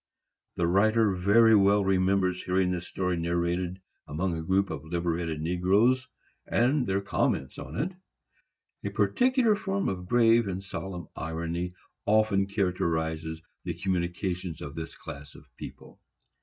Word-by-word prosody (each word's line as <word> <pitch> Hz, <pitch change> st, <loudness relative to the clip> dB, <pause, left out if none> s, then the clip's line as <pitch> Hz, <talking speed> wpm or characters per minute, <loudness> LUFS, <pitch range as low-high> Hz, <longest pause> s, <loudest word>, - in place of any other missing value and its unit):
The 85 Hz, -, +1 dB
writer 110 Hz, +4 st, +3 dB
very 105 Hz, +5 st, +5 dB
well 100 Hz, 0 st, +4 dB
remembers 95 Hz, -1 st, +2 dB
hearing 90 Hz, 0 st, +1 dB
this 90 Hz, -1 st, -3 dB
story 90 Hz, -2 st, -1 dB
narrated 85 Hz, +2 st, -1 dB, 0.3 s
among 85 Hz, +3 st, -1 dB
a 80 Hz, -, -3 dB
group 95 Hz, +3 st, +1 dB
of 80 Hz, -2 st, -5 dB
liberated 85 Hz, -1 st, -2 dB
negroes, 100 Hz, +10 st, +2 dB, 0.4 s
and 125 Hz, +1 st, +2 dB
their 95 Hz, +1 st, +1 dB
comments 65 Hz, -8 st, -1 dB
on -, -, -8 dB
it. 160 Hz, +9 st, -1 dB, 0.9 s
A -, -, -1 dB
peculiar 255 Hz, -4 st, +3 dB
form 195 Hz, -1 st, -2 dB
of 90 Hz, -1 st, -3 dB
grave 115 Hz, -2 st, +4 dB
and 95 Hz, 0 st, -4 dB
solemn 95 Hz, -3 st, -6 dB
irony 85 Hz, +2 st, -3 dB, 0.3 s
often 105 Hz, -2 st, +3 dB
characterizes 80 Hz, -5 st, -1 dB, 0.2 s
the -, -, -3 dB
communications 90 Hz, -2 st, -2 dB
of 70 Hz, -, -7 dB
this 80 Hz, -1 st, -6 dB
class 75 Hz, +1 st, -10 dB
of -, -, -14 dB
people. -, -, -11 dB
90 Hz, 135 wpm, -28 LUFS, 85-100 Hz, 0.9 s, very